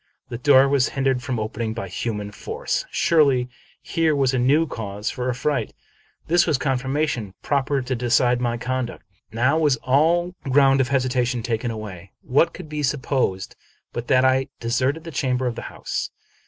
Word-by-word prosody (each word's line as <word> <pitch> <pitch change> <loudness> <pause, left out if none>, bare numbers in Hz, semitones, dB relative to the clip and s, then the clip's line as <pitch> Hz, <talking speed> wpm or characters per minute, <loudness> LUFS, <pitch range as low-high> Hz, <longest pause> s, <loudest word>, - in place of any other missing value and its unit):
The 120 -2 -5
door 135 0 +6
was 140 -2 +2
hindered 135 -2 +1
from 125 -2 -3
opening 110 +1 -3
by 115 -5 -4
human 105 +2 -4
force. - - -3
Surely, 140 -6 +3 0.3
here 165 -3 +1
was 135 -2 +2
a 130 - +1
new 145 +6 +3
cause 105 -6 -4
for 125 0 -3
affright. 125 -1 -1 0.5
This 170 +1 +3
was 155 -4 +2
confirmation 130 -5 -1
proper 140 -1 0
to 130 +1 -2
decide 120 0 +2
my 120 -1 0
conduct. 130 0 -4 0.3
Now 130 +7 +2
was 150 -4 +3
all 165 +7 +2
ground 135 0 +4
of 130 - -1
hesi 130 -2 +1
tation 120 -1 -1
taken 120 +1 -1
away. 100 -5 -8
What 155 +6 +3
could - - -10
be 150 0 -4
supposed 130 -8 -1 0.4
but 120 0 -5
that 130 -1 +4
I 130 0 +3
de 115 - -4
serted 135 +6 0
the 165 - -8
chamber 130 -4 -1
and 120 -2 -1
the - - -6
house - - -4
130 Hz, 175 wpm, -23 LUFS, 120-140 Hz, 0.5 s, door